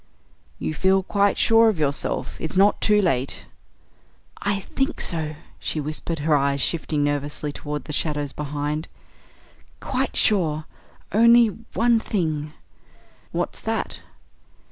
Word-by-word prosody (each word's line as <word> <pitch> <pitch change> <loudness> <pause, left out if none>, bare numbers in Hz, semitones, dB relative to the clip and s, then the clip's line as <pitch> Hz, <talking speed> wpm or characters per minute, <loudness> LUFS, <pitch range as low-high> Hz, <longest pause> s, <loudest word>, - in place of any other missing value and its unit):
"You - - -3
feel 190 +4 +2
quite 200 +1 +2
sure 225 0 +5
of 210 - -1
yourself? 145 -2 -1
It's 160 +3 -3
not 200 +2 +4
too 210 -1 +4
late 135 -7 0 0.5
" - - -37
"I 200 -1 -1
think 270 - -2
so," 155 -3 -1 0.2
she 155 - -2
whispered, 155 +2 -3
her 155 -2 +4
eyes 140 0 +1
shifting 155 0 0
nervously 145 +1 -2
toward 145 -1 -5
the 150 - -6
shadows 145 -2 -1
behind. 150 +1 -3 0.9
"Quite 265 0 -2
sure, 160 -7 +2 0.5
only 235 +1 +6 0.3
one 235 -1 +4
thing 155 -8 -2 0.4
" - - -28 0.3
"What's - - -3
that?" - - -3
155 Hz, 130 wpm, -23 LUFS, 150-205 Hz, 0.9 s, only